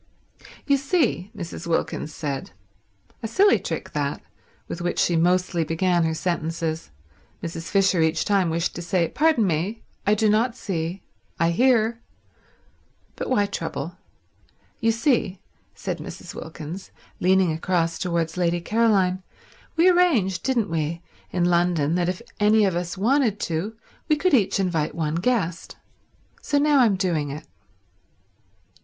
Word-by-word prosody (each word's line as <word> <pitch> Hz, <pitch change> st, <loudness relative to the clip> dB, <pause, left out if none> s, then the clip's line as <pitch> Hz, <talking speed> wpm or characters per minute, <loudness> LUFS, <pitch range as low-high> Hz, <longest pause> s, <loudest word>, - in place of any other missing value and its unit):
"You 280 Hz, -1 st, +3 dB
see," 275 Hz, -, 0 dB
Mrs. 170 Hz, -2 st, -6 dB
Wilkins 165 Hz, -2 st, -1 dB
said—a 100 Hz, -, -8 dB
silly 400 Hz, -, +4 dB
trick -, -, -5 dB
that, -, -, -2 dB, 0.5 s
with 170 Hz, -, -5 dB
which 175 Hz, 0 st, -2 dB
she 175 Hz, -, +2 dB
mostly 175 Hz, 0 st, +2 dB
began 170 Hz, +1 st, +1 dB
her 160 Hz, 0 st, 0 dB
sentences; 165 Hz, -2 st, -2 dB, 0.5 s
Mrs. 165 Hz, 0 st, -5 dB
Fisher 195 Hz, -3 st, +3 dB
each 160 Hz, 0 st, +1 dB
time 195 Hz, -4 st, +2 dB
wished 170 Hz, +1 st, -1 dB
to 175 Hz, -, -6 dB
say, 175 Hz, 0 st, +1 dB
"Pardon 305 Hz, -7 st, +3 dB
me—I 200 Hz, +4 st, -1 dB
do 215 Hz, +1 st, +2 dB
not 225 Hz, +3 st, +2 dB
see, 175 Hz, -4 st, -4 dB, 0.4 s
I 170 Hz, 0 st, +3 dB
hear"—but 235 Hz, +2 st, -3 dB
why 205 Hz, -6 st, +3 dB
trouble?—"You 225 Hz, +2 st, -6 dB
see," 225 Hz, -, +1 dB, 0.4 s
said -, -, -4 dB
Mrs. -, -, -8 dB
Wilkins, 160 Hz, +3 st, -8 dB, 0.3 s
leaning 185 Hz, -1 st, +3 dB
across 165 Hz, +1 st, 0 dB
towards 170 Hz, -2 st, -1 dB
Lady 175 Hz, -1 st, +1 dB
Caroline, 195 Hz, -2 st, +2 dB, 0.5 s
"we 335 Hz, +2 st, +5 dB
arranged, 315 Hz, -, +3 dB
didn't 235 Hz, -8 st, 0 dB
we, 165 Hz, +1 st, -2 dB, 0.3 s
in 175 Hz, -1 st, 0 dB
London 170 Hz, -3 st, +2 dB
that 175 Hz, 0 st, +1 dB
if 185 Hz, +5 st, -4 dB, 0.2 s
any 210 Hz, 0 st, +5 dB
of 190 Hz, -3 st, 0 dB
us 175 Hz, +1 st, -3 dB
wanted 230 Hz, 0 st, +2 dB
to 180 Hz, +7 st, -3 dB, 0.3 s
we 305 Hz, -, +4 dB
could 365 Hz, +3 st, +1 dB
each 210 Hz, -5 st, +3 dB
invite 170 Hz, -5 st, 0 dB
one 155 Hz, -2 st, -1 dB
guest. 180 Hz, -2 st, -1 dB, 0.6 s
So 290 Hz, -, 0 dB
now 290 Hz, 0 st, +4 dB
I'm 225 Hz, -6 st, +4 dB
doing 170 Hz, -6 st, 0 dB
it." 150 Hz, +3 st, -7 dB
180 Hz, 135 wpm, -24 LUFS, 165-220 Hz, 0.6 s, we